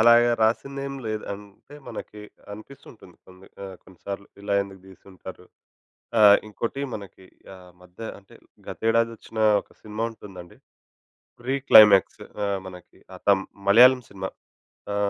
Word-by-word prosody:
అలాగా 120 +1 +6
రాసిందేమి 135 +4 -1
లేదు. 110 -1 -3
అంటే 100 +7 -13
మనకి 105 -1 -9 0.3
అనిపిస్తుంటుంది 110 -4 -14
కొన్ని 95 +1 -17 0.2
ఆహ్, 95 -1 -9
కొన్ని 95 - -19
సార్లు 100 0 -6 0.2
ఇలా 100 0 -1
ఎందుకు 95 -1 -12
తీసుంటారు. 95 -1 -13 0.7
ఆహ్, 105 -1 +8
ఇంకోటి 115 +6 -5
మనకి 100 -2 -12 0.3
ఆ - - -14 0.2
మధ్య 90 +3 -21
ఆహ్, - - -9
అంటే 95 - -20 0.3
గతేడాది 115 +1 0
వచ్చిన 110 +1 -9 0.2
ఒక - - -27
సినిమా 110 +1 -5
ఉంటుందండి, 95 -4 -13 0.8
ప్రీ 130 +3 -1
క్లైమాక్స్ 105 -3 +7 0.2
ఆహ్, 100 -1 -1
మనకి 90 -1 -13 0.2
ఆహ్, - - -12
తం 95 -1 +4 0.3
మలయాళం 125 +4 +7
సినిమా. 95 -1 -6 0.6
ఆ! - - -2
105 Hz, 135 wpm, -24 LUFS, 95-115 Hz, 0.8 s, ఆహ్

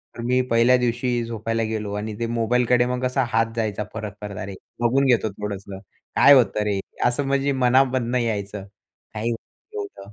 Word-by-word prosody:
तर - - -6
मी 125 +1 +3
पहिल्या 115 +2 +5
दिवशी 120 0 0
झोपायला 115 0 -2
गेलो 110 -2 -3
आणि 105 +1 -4
ते 115 - -1
मोबाईलकडे 120 +1 +2
मग 125 0 -2
कसा 130 +1 +1
हात 115 0 +1
जायचा 110 -2 -1
परत-परत. 105 -2 -7
अरे 100 0 -6 0.2
बघून 130 +4 +2
घेतो 120 -4 +3
थोडंसं 100 -1 -6 0.4
काय 145 - +8
होतं 110 -5 +4
रे? 100 -2 0 0.3
असं 130 +4 +1
म्हणजे 140 +1 +1
मनामधनं 130 -1 +2
यायचं 105 -4 -2 0.5
काय 110 +1 -3
एवढं 100 -3 -7
115 Hz, 160 wpm, -23 LUFS, 105-125 Hz, 0.5 s, काय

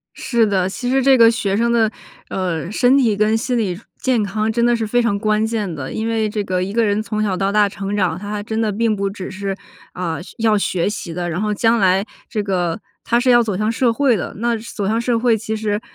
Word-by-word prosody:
是 235 -3 +1
的， 190 -3 +1
其 245 +5 -4
实 270 +1 +2
这 265 0 +5
个 230 -1 +7
学 200 -4 -1
生 235 +1 +2
的， 225 -2 +2 0.4
呃， 180 -2 -3
身 250 +5 +4
体 235 -6 +3
跟 215 +1 +2
心 245 +2 -1
理 190 -6 -1 0.2
健 255 -4 +1
康 215 +2 -1
真 235 +2 0
的 240 0 +4
是 225 -1 -2
非 245 +3 +1
常 230 -4 +1
关 215 +1 +1
键 215 -5 -2
的， 140 -4 -6
因 220 - -3
为 225 -1 0
这 210 0 -2
个 185 -1 -1
一 190 - -4
个 230 +2 +2
人 205 0 +1
从 215 -1 -3
小 200 -3 0
到 195 +1 0
大 210 0 +4
成 200 0 -4
长， 185 -5 0
他 205 +1 -7
还 210 -1 -3
真 220 +1 -3
的 220 -2 +1
并 220 +1 +1
不 200 -1 -1
只 195 -2 -7
是， 195 0 -4 0.4
啊， 170 -3 -3
学 175 - -13
要 220 -2 +3
学 185 -3 0
习 205 -5 -4
的， 175 0 -3
然 175 - -2
后 210 0 0
将 225 +2 +2
来 190 0 +3 0.2
这 210 -3 -2
个 180 -4 -1 0.2
他 235 0 +2
是 250 +1 +3
要 240 - +6
走 210 -5 -2
向 215 +2 0
社 235 +1 +2
会 260 0 +2
的。 190 - -4
那 235 +1 0
走 215 -3 -5
向 225 +2 +1
社 235 0 +1
会， 235 0 +3
其 220 +1 -4
实， 215 0 -2
215 Hz, 275 characters per minute, -19 LUFS, 195-230 Hz, 0.4 s, 个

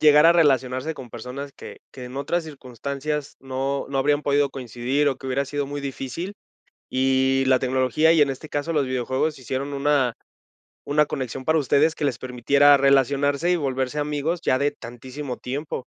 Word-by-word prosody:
llegar 150 +1 +7
a 170 - +7
relacionarse 135 -2 +2
con 130 -4 -10
personas 125 +5 -7
que - - -10
que 130 - -9
en 125 +2 -9
otras 160 +5 -1
circunstancias 140 +1 -5
no 135 +1 -3
no 135 0 -2
habrían 145 +2 +2
podido 145 -1 +2
coincidir 130 +3 -1
o 135 - -1
que 135 - -10
hubiera 135 +2 0
sido 145 +1 -3
muy 145 +1 -5
difícil, 140 +8 -5 0.6
y 130 0 +2
la 130 -1 +4
tecnología 130 +4 +2
y, 160 - +4
en 145 - +4
este 135 +3 -6
caso, 145 +3 -2
los 145 -3 +2
videojuegos, 130 +4 -1
hicieron 130 +2 -4
una 140 -3 +2 0.7
una 150 +1 +2
conexión 130 -2 -5
para 160 +2 +3
ustedes 150 +3 +2
que - - -3
les 130 -6 0
permitiera 140 +3 +4
relacionarse 140 +3 +2
y 180 - +3
volverse 135 -1 -2
amigos 150 +3 -1
ya 130 - +2
de 145 +2 +2
tantísimo 130 +1 -8
tiempo. 140 +1 -5
140 Hz, 175 wpm, -23 LUFS, 130-145 Hz, 0.7 s, llegar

